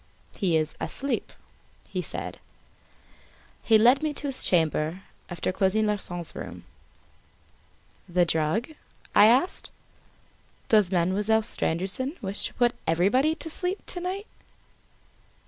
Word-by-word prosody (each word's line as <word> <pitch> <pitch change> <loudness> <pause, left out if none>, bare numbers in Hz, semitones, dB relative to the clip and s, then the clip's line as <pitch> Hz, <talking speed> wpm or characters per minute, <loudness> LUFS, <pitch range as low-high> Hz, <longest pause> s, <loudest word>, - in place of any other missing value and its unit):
"He 175 -6 +1
is 155 -1 -1
asleep," 275 +1 -3 0.6
he - - -3
said. - - -5 1.2
He 225 - +5
led 245 +6 +5
me 305 -1 -2
to 290 - -4
his 265 - -1
chamber, 165 +1 +1 0.3
after 175 0 -2
closing 195 +3 +1
Larsan's 175 -5 -2
room. 90 -2 -8 1.5
"The 175 0 +3
drug?" 165 - 0 0.4
I 205 - +8
asked. 260 +11 +2 1.0
"Does 210 -4 +4
Mademoiselle 200 +5 +2
Stangerson 215 - -1
wish 195 0 -1
to - - -6
put 240 -1 +2
everybody 230 - +2
to 330 - -4
sleep, 360 +4 -1
to 355 - -3
night?" 375 +3 -4
210 Hz, 115 wpm, -26 LUFS, 175-260 Hz, 1.5 s, I